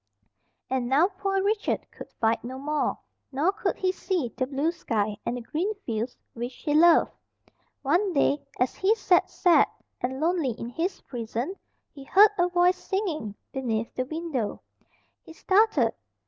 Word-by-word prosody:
And 255 -2 -1
now 300 +8 +4
poor 390 0 -1
Richard 415 +1 0
could - - -11
fight 225 0 +1
no 255 +2 -6
more, 295 +2 -1 0.3
nor 290 +8 +2
could 410 - -2
he 370 -1 0
see 360 - -2
the 255 - -1
blue 285 +4 0
sky, 215 -10 -1
and 245 - -1
the - - -5
green 345 - -2
fields 230 +1 -3 0.2
which 240 +2 -5
he 295 - -2
loved. 335 +2 +6 0.7
One 350 +8 +2
day, 285 -2 +2 0.2
as 250 +1 +1
he 405 +4 +2
sat 375 -5 +3
sad 350 -2 +4 0.3
and 260 +1 -2
lonely 320 -5 +1
in 235 - -5
his 335 +10 -3
prison, 240 - -4 0.4
he 275 - -10
heard 400 +9 +6
a 350 0 +3
voice 360 +1 +2
singing, 325 - -2 0.2
beneath 230 -4 -2
the 255 - -2
window. 315 -8 -3 0.6
He 325 - -13
started. 375 - +3
300 Hz, 160 wpm, -26 LUFS, 245-365 Hz, 0.7 s, loved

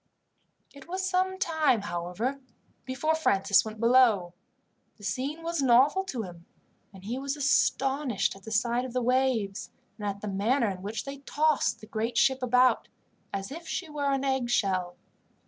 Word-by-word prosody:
It 280 +1 -14
was 375 +2 -2
some 375 0 0
time, 315 - +2
however, 200 +8 -3 0.5
before 265 +5 0
Francis 200 -11 +3
went 220 0 -8
below. 230 -7 +4 0.6
The 205 - -17
scene 270 +11 -3
was 335 -2 -1
novel 270 +8 +4
to 250 -11 -4
him, 175 -3 -11 0.4
and 190 -2 -14
he 235 +6 -4
was 275 +1 -3
astonished 270 -4 +1
at 195 - -14
the 220 - -9
sight 235 +3 +1
of 255 -2 -6
the 255 - 0
waves, 250 -5 0 0.3
and 210 - -3
at 200 0 -4
the 210 - -5
manner 210 +4 +1
in 185 -1 -8
which 210 +3 -4
they 275 0 -7
tossed 285 -6 +1
the - - -10
great 225 +2 -3
ship 265 +1 +3
about, 250 +1 +3 0.4
as 195 +4 -4
if 330 +3 -8
she 350 -4 -4
were 285 -2 -1
an 275 0 0
eggshell. 205 -9 0
250 Hz, 165 wpm, -28 LUFS, 205-280 Hz, 0.6 s, below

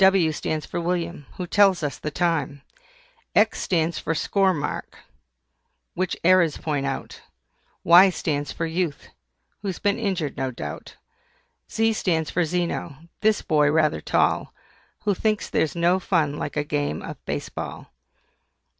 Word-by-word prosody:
W 190 -4 +5
stands 155 0 -3
for 170 - -4
WILLIAM, 170 -3 -2
who 180 - -3
tells 190 -2 +4
us 145 -2 -3
the 150 - -3
time. 150 -3 -1 0.7
X 215 +1 +3
stands 165 -2 0
for 165 - -2
SCORE 195 +4 +2
MARK, 145 -5 -4 1.0
which 185 0 -2
errors 175 -3 +4
point 145 -3 -2
out. 135 - -5 0.6
Y 180 +3 +8
stands 145 -5 -2
for 165 - -3
YOUTH, 165 -3 -2 0.5
who's 195 -3 -3
been 205 +3 0
injured 190 - -2
no 135 -1 -1
doubt. 120 - -7 0.8
Z 225 0 +2
stands 165 -6 0
for 175 -1 +1
ZENO, 170 -2 -3
this 215 0 +2
boy 150 -2 +3
rather 155 - +2
tall, - - +1 0.5
Who 205 - +2
thinks 215 +2 -1
there's 150 -3 +1
no 175 +2 +3
fun 155 -6 0
like - - -4
a 150 - +1
game 145 -1 -2
of - - -8
Base - - -3
Ball. - - -7
170 Hz, 145 wpm, -24 LUFS, 150-185 Hz, 1.0 s, Y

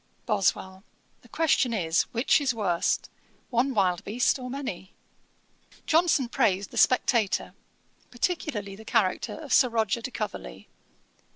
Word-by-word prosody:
BOSWELL. 190 -3 -1 0.4
'The - - -20
question 280 -6 +1
is, 165 -4 +1
which 245 +5 +2
is 265 -4 0
worst, 180 -6 0 0.4
one 250 +2 +1
wild 180 -4 +1
beast 245 +5 +1
or 250 0 -6
many?' 250 -9 -6 0.9
Johnson 320 -5 +3
praised 205 -6 0
The - - -8
Spectator, 235 -5 +2 0.6
particularly 240 - -3
the 220 - -12
character 190 -3 0
of 310 -3 -5
Sir 250 - +5
Roger 225 -1 0
de 245 - -4
Coverley. 210 - -6
230 Hz, 125 wpm, -26 LUFS, 195-260 Hz, 0.9 s, Sir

